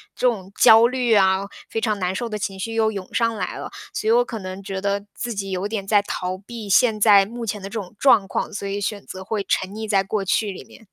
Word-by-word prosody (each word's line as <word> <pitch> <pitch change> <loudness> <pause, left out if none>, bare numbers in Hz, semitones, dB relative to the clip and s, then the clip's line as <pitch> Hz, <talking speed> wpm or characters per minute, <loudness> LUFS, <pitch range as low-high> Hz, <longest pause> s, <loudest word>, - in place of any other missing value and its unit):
这 250 - +2
种 195 -5 -2
焦 225 +1 +8
虑 250 -2 -1
呀， 190 -1 +4 0.2
非 225 - -2
常 215 -2 0
难 180 0 -1
受 235 +4 -3
的 215 -1 -4
情 195 -1 -4
绪 225 +3 -4
又 220 -1 +2
涌 195 -3 -7
上 230 -1 +1
来 185 -3 -4
了， - - -6 0.2
所 425 +1 -3
以 - - +5
我 485 +1 +4
可 225 - -6
能 185 +1 -7
觉 195 0 -4
得 200 0 -1
自 240 -1 -3
己 195 -1 -4
有 185 +2 -2
点 205 -3 -4
在 205 -1 +4
逃 185 -2 -4
避 220 0 -9
现 215 +2 +3
在 200 -2 +6
目 235 +2 -6
前 210 -2 -3
的 195 - -6
这 - - -14
种 195 +1 -9
状 220 -8 +5
况， - - -3
所 200 -1 -5
以 200 +1 -3
选 205 0 -3
择 190 0 -8
会 205 0 -3
沉 185 - 0
溺 220 +1 -6
在 195 -2 +2
过 195 0 -2
去 205 +2 +1
里 185 - -9
面。 - - -17
205 Hz, 285 characters per minute, -22 LUFS, 195-225 Hz, 0.2 s, 焦